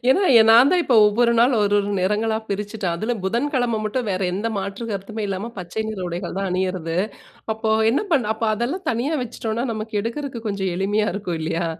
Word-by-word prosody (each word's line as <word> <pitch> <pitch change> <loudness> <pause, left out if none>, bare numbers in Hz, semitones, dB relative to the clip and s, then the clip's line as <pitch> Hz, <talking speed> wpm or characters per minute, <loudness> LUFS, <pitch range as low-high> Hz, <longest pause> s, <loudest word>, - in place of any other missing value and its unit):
ஏன்னா, 380 +10 +4 0.3
நான் 235 +5 +7
தான் 360 - +4
இப்போ 245 - +3
ஒவ்வொரு 235 +3 +3
நாள் 245 +3 +4
ஒரு, 205 0 +2
ஒரு 200 0 -1
நிறங்களா 215 +4 +1
பிரிச்சுட்டேன். 200 -3 -2
அதுல 220 +7 -1
புதன்கிழமை 245 +1 0
மட்டும் 225 +1 -2
வேற 185 0 -1
எந்த 205 +5 -2
மாற்று 200 +4 -5
கருத்துமே 210 +2 -4
இல்லாம 195 +4 -4
பச்சை 185 +5 -4
நிற 215 - -6
உடைகள் 175 +2 -5
தான் 195 -1 -1
அணியிறது. 180 -2 -2 0.6
அப்போ 220 0 -2 0.2
என்ன 260 - +1
பண் 260 -7 +3
அப்ப 220 - -12
அதெல்லாம் 255 - -3
தனியா 245 +7 -1
வச்சுட்டோன்னா, 225 0 -3
நமக்கு 215 0 -5
எடுக்கறக்கு 240 +2 -4
கொஞ்சம் 190 -3 -2
எளிமையா 205 +3 +1
இருக்கும் 185 -5 -3
இல்லயா! 165 +2 -1
215 Hz, 185 wpm, -22 LUFS, 195-235 Hz, 0.6 s, நான்